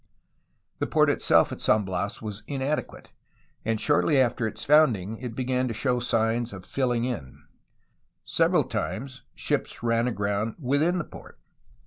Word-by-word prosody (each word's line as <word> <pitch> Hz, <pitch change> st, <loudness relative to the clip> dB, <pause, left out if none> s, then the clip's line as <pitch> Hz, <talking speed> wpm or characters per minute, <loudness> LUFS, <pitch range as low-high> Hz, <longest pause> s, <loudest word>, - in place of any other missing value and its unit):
The -, -, -1 dB
port -, -, +4 dB
itself -, -, +3 dB
at -, -, -7 dB
San 105 Hz, -1 st, +3 dB
Bias 95 Hz, +3 st, -3 dB
was 105 Hz, -1 st, -5 dB
inadequate, 140 Hz, +1 st, -3 dB, 0.5 s
and 110 Hz, 0 st, -1 dB
shortly 145 Hz, +1 st, +3 dB
after 120 Hz, -2 st, +2 dB
its 110 Hz, +1 st, -7 dB
founding 115 Hz, -9 st, +3 dB
it 120 Hz, -2 st, -6 dB
began 130 Hz, 0 st, 0 dB
to 115 Hz, -, -4 dB
show 125 Hz, +1 st, +1 dB
signs 115 Hz, -1 st, 0 dB
of 95 Hz, -2 st, -9 dB
filling 125 Hz, -3 st, 0 dB
in. 100 Hz, -, -6 dB, 0.8 s
Several -, -, +3 dB
times, 130 Hz, +3 st, -4 dB
ships -, -, -2 dB
ran 115 Hz, 0 st, +2 dB
aground 105 Hz, -1 st, -1 dB
within 150 Hz, +6 st, +1 dB
the 170 Hz, -, -2 dB
port. -, -, -13 dB
120 Hz, 145 wpm, -26 LUFS, 110-130 Hz, 0.8 s, port